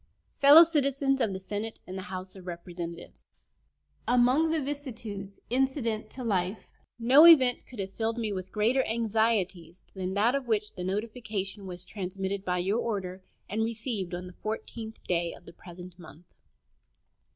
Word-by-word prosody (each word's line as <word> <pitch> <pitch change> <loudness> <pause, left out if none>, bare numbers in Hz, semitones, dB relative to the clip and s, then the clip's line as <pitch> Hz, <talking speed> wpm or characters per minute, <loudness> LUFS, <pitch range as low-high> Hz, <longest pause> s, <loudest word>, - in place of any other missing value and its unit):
] - - -42
Fellow 290 +4 +10
Citizens 275 -4 +1
of 220 -4 +1
the 190 - -4
Senate 210 +3 -5
and 185 - -8
of - - -4
the 190 +2 -7
House 185 0 -6
of 185 -1 -12
Representatives: 170 -1 -8 0.8
Among 250 +6 +4
the 320 0 +1
vicissitudes 230 -9 -6
incident 250 -4 0
to 255 - -8
life 195 -2 -1 0.3
no 260 +8 +7
event 260 -7 +6
could 250 - -12
have 195 -1 -5
filled 225 +2 -2
me 220 -3 -2
with 185 -1 -6
greater 235 +5 +2
anxieties 215 -6 0
than 190 0 -4
that 220 +5 +3
of 275 -2 -2
which 210 -2 0
the 180 - -6
notification 205 -1 -4
was 180 0 -7
transmitted 195 0 -4
by 180 -2 -1
your 195 +6 0
order, 190 -5 -3 0.3
and 220 +2 -1
received 220 -5 -3
on 180 +1 -6
the 180 - -10
14th 220 +2 -6
day 170 -1 -1
of - - -18
the 170 - -12
present 180 +1 -12
month. 165 0 -14
210 Hz, 165 wpm, -28 LUFS, 185-240 Hz, 0.8 s, Fellow